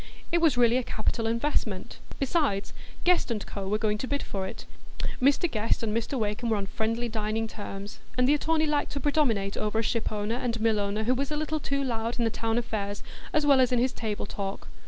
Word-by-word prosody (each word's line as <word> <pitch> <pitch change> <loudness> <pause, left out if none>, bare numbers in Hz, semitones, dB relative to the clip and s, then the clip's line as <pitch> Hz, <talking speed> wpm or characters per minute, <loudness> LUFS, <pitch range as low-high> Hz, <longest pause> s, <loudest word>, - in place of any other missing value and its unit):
It 340 0 +3
was 310 -7 +4
really 240 0 +5
a 255 - 0
capital 225 0 -1
investment; 230 -5 -1 0.2
besides, 275 - +1 0.3
Guest 355 -7 +3
&Co. 195 -1 -5
were 210 +2 +2
going 210 -1 0
to 260 - -2
bid 285 +1 -1
for 190 -1 -3
it. - - -8 0.6
Mr 280 +6 +4
Guest 225 -5 0
and 215 -1 0
Mr 230 +4 -1
Wakem 215 +1 -1
were 220 - +2
on 200 - -2
friendly 230 +4 -1
dining 220 0 -1
terms, 205 -1 -7 0.2
and 250 0 +4
the 285 - +6
attorney 315 +1 +2
liked 295 -1 0
to 285 - -1
predominate 245 -10 +1
over 215 +1 -1
a 225 - +2
ship 230 +1 0
owner 210 +2 -1
and 240 -2 -1
mill 220 -1 +3
owner 205 +2 0
who 245 +3 +3
was 275 +2 -1
a 300 - 0
little 310 +1 -1
too 275 -1 -1
loud 230 -2 -2
in 240 - +1
the 225 - +1
town 225 +1 -1
affairs 205 -4 -2 0.3
as 305 -1 +2
well 275 -2 +6
as 255 - +3
in 250 - +3
his 250 +2 +2
table 215 -2 -3
talk. 195 -1 -5
230 Hz, 220 wpm, -28 LUFS, 210-275 Hz, 0.6 s, the